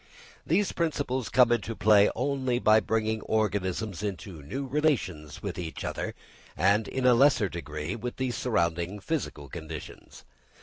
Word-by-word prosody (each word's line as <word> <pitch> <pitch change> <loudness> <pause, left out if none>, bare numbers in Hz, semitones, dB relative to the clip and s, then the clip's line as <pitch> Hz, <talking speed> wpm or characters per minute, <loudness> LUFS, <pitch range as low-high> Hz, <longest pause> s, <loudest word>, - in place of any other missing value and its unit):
These 205 -1 +2
principles 140 -7 -1
come 125 -2 +5
into 115 -1 0
play 105 -1 +5
only 130 -1 0
by 110 -2 +5
bringing 110 0 -1
organisms 100 -2 -1
into 95 -5 -5
new 135 - -5
relations 125 - -1
with - - -4
each 80 -2 -5
other - - -4 0.4
and 100 +5 +3
in 130 -1 -2
a 125 - +7
lesser 125 -4 +4
degree 75 +1 -5
with 120 +2 -5
the 130 -1 -1
surrounding 85 -5 -1
physical 100 - -3
conditions. 80 +1 -9
110 Hz, 140 wpm, -28 LUFS, 85-125 Hz, 0.4 s, a